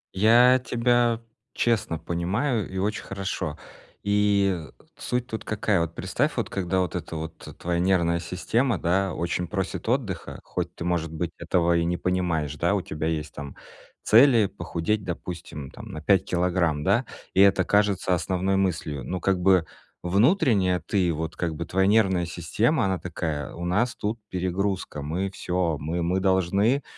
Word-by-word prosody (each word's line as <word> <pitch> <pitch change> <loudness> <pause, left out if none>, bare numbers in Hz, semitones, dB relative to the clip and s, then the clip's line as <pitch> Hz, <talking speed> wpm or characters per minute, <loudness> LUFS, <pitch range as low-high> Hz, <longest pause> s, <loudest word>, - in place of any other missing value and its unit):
Я 120 +5 +6
тебя 120 -1 +2 0.3
честно 110 -8 0
понимаю, 95 - -1
и 95 - -6
очень 105 +2 -1
хорошо. 95 -5 -4 0.5
И 100 -2 +2 0.4
суть 125 0 -2
тут 110 -3 -6
какая? 105 -3 0
Вот 85 0 -3
представь, - - -1
вот - - -2
когда 95 -1 0
вот 90 - -2
эта 85 -1 -5
вот 80 +1 -5 0.2
твоя 85 0 -1
нервная 85 -2 +2
система, 110 +7 0
да, 90 0 0
очень 85 +1 -2
просит 95 +5 -3
отдыха, 115 -9 -2
хоть 85 -1 -4
ты - - -6
может 85 -2 -1
быть 80 +1 -3
этого 85 0 +2
и 85 - +1
не 90 +1 0
понимаешь, 85 -6 -1
да. - - +2
У - - 0
тебя 75 +1 -3
есть, 75 -2 -3
там, 70 -1 -8 0.5
цели 115 -1 +6
похудеть, 100 +3 -2
допустим, 85 -5 -6
там - - -10
на - - -6
5 95 +2 +3
килограмм, 85 -4 0
да, 110 - +2 0.3
и 95 - +5
это 100 -1 +5
кажется 100 -1 +2
основной 95 +2 0
мыслью. 80 -7 -1
Ну, 90 +9 -3
как 95 +1 +1
бы 90 -3 +4 0.4
внутренне 100 - +3
ты 95 -4 +1
вот 80 +2 -4
как 85 -2 -2
бы, 85 - -4
твоя 95 +3 +1
нервная 95 -5 +3
система, 100 - 0
она 95 -2 0
такая: 80 -5 -4
"У 85 - -5
нас 105 +7 +1
тут 110 +3 -3
перегрузка, 95 -3 -2
мы 90 +7 -2
всё, 90 -4 -1
мы 85 +4 -2
мы 90 +3 +1
должны 100 +7 +2
90 Hz, 160 wpm, -25 LUFS, 85-105 Hz, 0.5 s, Я